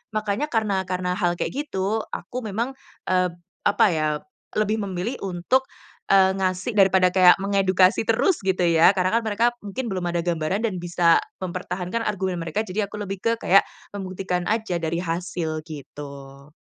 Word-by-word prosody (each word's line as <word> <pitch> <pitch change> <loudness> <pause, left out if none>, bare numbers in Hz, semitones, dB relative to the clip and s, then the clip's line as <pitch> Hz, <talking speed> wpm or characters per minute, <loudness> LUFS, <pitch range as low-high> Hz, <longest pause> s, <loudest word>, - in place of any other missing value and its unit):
makanya 215 +7 -1
karena 210 -6 0
karena 180 0 -1
hal 175 -3 +2
kayak - - -1 0.2
gitu, 195 +2 -1
aku 250 - -5
memang, 225 +5 -2 0.4
eee, 180 -1 +2 0.4
apa 205 +1 +4
ya, 155 -2 0 0.5
lebih 215 +1 +1
memilih 190 +7 -3
untuk, 195 +9 0 0.4
eee, 190 -1 +6
ngasih 185 +4 -1
daripada 190 -1 +5
kayak 180 -1 +7
mengedukasi 195 0 +3
terus 300 - +2
gitu 185 -1 +1
ya. 170 +2 +5
Karena 185 0 +1
kan 235 - -8
mereka 220 +2 +1
mungkin 215 +3 -5
belum 185 -2 -2
ada 170 - 0
gambaran 175 +4 -1
dan 205 -6 -1
bisa 175 -1 +3 0.2
mempertahankan 180 +4 -3
argumen 190 -3 -2
mereka, 170 +6 -2
jadi 205 0 -2
aku - - -10
lebih 195 -1 -5
ke 230 - +3
kayak 195 +2 +5 0.2
membuktikan 185 -2 -3
aja 215 -5 0
dari 165 +1 -2
hasil 165 -2 -3
gitu. 140 -1 -10
185 Hz, 160 wpm, -24 LUFS, 175-205 Hz, 0.5 s, kayak